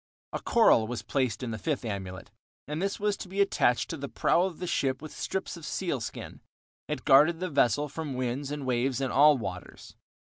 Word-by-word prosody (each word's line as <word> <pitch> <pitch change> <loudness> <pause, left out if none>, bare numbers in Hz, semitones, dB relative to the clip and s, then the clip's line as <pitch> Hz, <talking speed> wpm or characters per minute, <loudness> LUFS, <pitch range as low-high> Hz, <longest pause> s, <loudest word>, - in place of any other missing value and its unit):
A - - -2
coral 220 - +4
was 115 -2 -4
placed 130 -1 -1
in 120 - -3
the 110 - -5
fifth 150 -6 -2
amulet, 95 -3 -6 0.4
and 150 +3 -3
this 195 0 -1
was 205 0 +1
to - - -8
be 190 +2 -5
attached 125 -11 +2
to 165 - -4
the 140 -1 -6
prow 175 - +2
of 185 -4 -5
the 180 - -5
ship 135 -6 0
with 155 +1 -9
strips 190 -1 -3
of 170 - -11
seal 160 -6 -2
skin; - - -7 0.5
it - - -4
guarded 155 +5 +6
the 185 0 -2
vessel 140 +1 +2
from 150 -1 -5
winds 130 +2 -2
and 145 -1 -4
waves 130 +1 0
in 135 -2 -1
all 145 +1 +6
waters. 90 -7 -8
140 Hz, 210 wpm, -28 LUFS, 120-165 Hz, 0.5 s, guarded